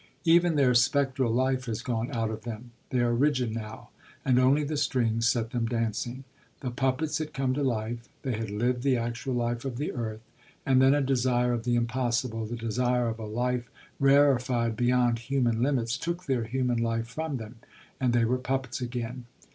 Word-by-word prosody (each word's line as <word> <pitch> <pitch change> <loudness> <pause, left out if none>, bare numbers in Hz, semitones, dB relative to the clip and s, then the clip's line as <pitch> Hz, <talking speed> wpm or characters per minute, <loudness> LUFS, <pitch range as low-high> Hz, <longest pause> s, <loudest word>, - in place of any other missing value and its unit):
Even 170 0 +5
their 135 -4 +4
spectral 130 0 +2
life 130 +1 +1
has 115 -4 -4
gone 120 -1 -2
out 115 -2 -1
of 110 0 -6
them; 120 +1 -7 0.2
they 125 - +1
are 120 0 +2
rigid 130 -3 +1
now, 110 -1 -7 0.4
and 125 -2 +4
only 135 +4 +4
the 150 +1 -2
strings 115 -5 +1
set 115 -2 0
them 120 -3 -1
dancing. 120 +2 -2 0.4
The 125 - -3
puppets 135 +5 0
had 155 -1 -5
come 135 -1 0
to 145 - -1
life, 115 -2 -2
they 130 - -1
had 110 -2 -3
lived 120 +4 0
the 130 -1 +2
actual 120 +2 -3
life 120 0 -1
of 130 -3 -4
the 145 - -2
earth; 110 -3 -4 0.4
and 130 -1 +4
then 135 +2 +6
a 145 - +2
desire 125 -2 +2
of 115 -1 -3
the 120 -1 +2
impossible, 115 -1 -1
the 120 - -4
desire 120 +1 0
of 115 0 -5
a 110 - -5
life 125 +2 -1 0.3
rarefied 130 -4 +3
beyond 120 0 +2
human 120 -2 0
limits, 125 -2 0
took 170 +2 -3
their 130 -5 0
human 125 0 0
life 115 0 0
from 150 +4 -4
them, 115 0 -9 0.4
and 125 -2 +2
they 120 -1 +3
were 125 +2 +1
puppets 130 0 -2
again. 125 0 -4
125 Hz, 190 wpm, -28 LUFS, 115-130 Hz, 0.4 s, then